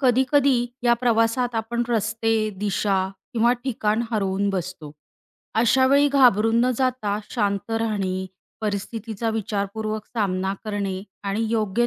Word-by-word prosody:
कधी-कधी 260 Hz, -1 st, +3 dB, 0.2 s
या 240 Hz, -1 st, +4 dB
प्रवासात 235 Hz, 0 st, +1 dB
आपण 230 Hz, +2 st, -1 dB
रस्ते, 225 Hz, 0 st, 0 dB, 0.3 s
दिशा 200 Hz, -1 st, 0 dB, 0.3 s
किंवा 235 Hz, +1 st, +3 dB
ठिकाण 220 Hz, -3 st, 0 dB
हरवून 200 Hz, -2 st, 0 dB
बसतो. 180 Hz, -5 st, -5 dB, 0.7 s
अशावेळी 265 Hz, +4 st, +4 dB
घाबरून 235 Hz, -5 st, +4 dB
न 255 Hz, -, +2 dB
जाता 250 Hz, -6 st, 0 dB
शांत 205 Hz, -2 st, -1 dB
राहणे, 200 Hz, -5 st, -1 dB, 0.3 s
परिस्थितीचा 220 Hz, +1 st, -3 dB
विचारपूर्वक 215 Hz, 0 st, -3 dB
सामना 195 Hz, -4 st, -1 dB
करणे, 200 Hz, -3 st, -3 dB, 0.2 s
आणि 200 Hz, +3 st, -1 dB
योग्य 225 Hz, +1 st, +1 dB
220 Hz, 110 wpm, -23 LUFS, 200-240 Hz, 0.7 s, या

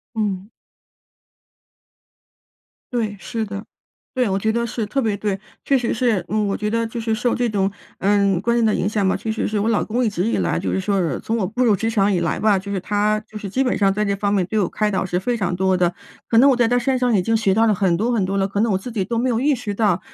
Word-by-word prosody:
嗯。 205 Hz, -2 st, -2 dB, 2.4 s
对， 220 Hz, -4 st, -1 dB
是 225 Hz, +2 st, -3 dB
的。 200 Hz, 0 st, -6 dB, 0.5 s
对， 250 Hz, -5 st, +1 dB
我 190 Hz, -, +1 dB
觉 220 Hz, +2 st, 0 dB
得 235 Hz, +1 st, -1 dB
是， 225 Hz, -1 st, -3 dB
特 270 Hz, +6 st, -1 dB
别 215 Hz, -4 st, 0 dB
对。 200 Hz, -1 st, -2 dB, 0.3 s
确 275 Hz, -, +3 dB
实 245 Hz, -3 st, 0 dB
是， 220 Hz, -7 st, +1 dB
嗯， 215 Hz, -1 st, 0 dB
我 195 Hz, -, -1 dB
觉 210 Hz, 0 st, -2 dB
得 230 Hz, +1 st, 0 dB
就 230 Hz, +1 st, -5 dB
是 225 Hz, -1 st, 0 dB
受 240 Hz, +2 st, 0 dB
这 245 Hz, -1 st, 0 dB
种， 195 Hz, -2 st, 0 dB, 0.3 s
呃， 200 Hz, -2 st, +2 dB
观 235 Hz, +3 st, +1 dB
念 235 Hz, -, +2 dB
的 215 Hz, -1 st, +3 dB
影 195 Hz, -, 0 dB
响 205 Hz, -2 st, 0 dB
吧， -, -, +1 dB
确 220 Hz, -, -3 dB
实 220 Hz, -, -1 dB
是 215 Hz, -, -2 dB
我 210 Hz, -, 0 dB
老 220 Hz, -, +2 dB
公 240 Hz, +3 st, -1 dB
一 220 Hz, -, +2 dB
直 180 Hz, -1 st, -1 dB
以 230 Hz, -, 0 dB
来 -, -, 0 dB
就 -, -, -2 dB
是 -, -, 0 dB
说 195 Hz, +1 st, 0 dB
是 165 Hz, -7 st, -1 dB
从 225 Hz, -, -2 dB
我 190 Hz, -4 st, 0 dB
步 245 Hz, +5 st, 0 dB
入 220 Hz, -3 st, +4 dB
职 225 Hz, +3 st, -1 dB
场 205 Hz, -3 st, +2 dB
以 180 Hz, -, +1 dB
来 170 Hz, -, -1 dB
吧， 205 Hz, -3 st, +3 dB
就 200 Hz, +1 st, -7 dB
是 195 Hz, -, -1 dB
他 210 Hz, +2 st, 0 dB
就 215 Hz, -, -19 dB
是 200 Hz, -2 st, -6 dB
基 260 Hz, +7 st, +1 dB
本 250 Hz, -, 0 dB
上 195 Hz, -1 st, +3 dB
在 210 Hz, +2 st, 0 dB
这 200 Hz, -1 st, 0 dB
方 200 Hz, 0 st, -1 dB
面 190 Hz, -3 st, +2 dB
对 215 Hz, +3 st, -1 dB
我 185 Hz, -, +1 dB
开 210 Hz, -1 st, 0 dB
导 190 Hz, -, 0 dB
是 180 Hz, -1 st, -1 dB
非 240 Hz, +5 st, -1 dB
常 195 Hz, -5 st, -1 dB
多 190 Hz, +1 st, +2 dB
的。 175 Hz, -1 st, +1 dB, 0.3 s
可 225 Hz, -, +3 dB
能 270 Hz, +4 st, +7 dB
我 -, -, +3 dB
在 240 Hz, -1 st, +3 dB
他 245 Hz, +1 st, +2 dB
身 255 Hz, +1 st, +1 dB
上 245 Hz, -3 st, +2 dB
已 180 Hz, -, +1 dB
经 225 Hz, +3 st, +1 dB
学 215 Hz, -3 st, +2 dB
到 225 Hz, +1 st, +4 dB
了 215 Hz, -, +3 dB
很 180 Hz, -3 st, +1 dB
多 230 Hz, +5 st, 0 dB
很 220 Hz, -5 st, +1 dB
多 195 Hz, +1 st, -1 dB
了， 195 Hz, 0 st, +1 dB
可 200 Hz, +1 st, -3 dB
能 225 Hz, -1 st, +2 dB
我 190 Hz, -, +2 dB
自 220 Hz, +6 st, -7 dB
己 215 Hz, -4 st, -1 dB
都 230 Hz, +5 st, -3 dB
没 245 Hz, +3 st, +1 dB
有 230 Hz, -2 st, +1 dB
意 285 Hz, +2 st, +2 dB
识 220 Hz, -4 st, -4 dB
到， 200 Hz, -4 st, +1 dB
210 Hz, 305 characters per minute, -21 LUFS, 195-230 Hz, 2.4 s, 能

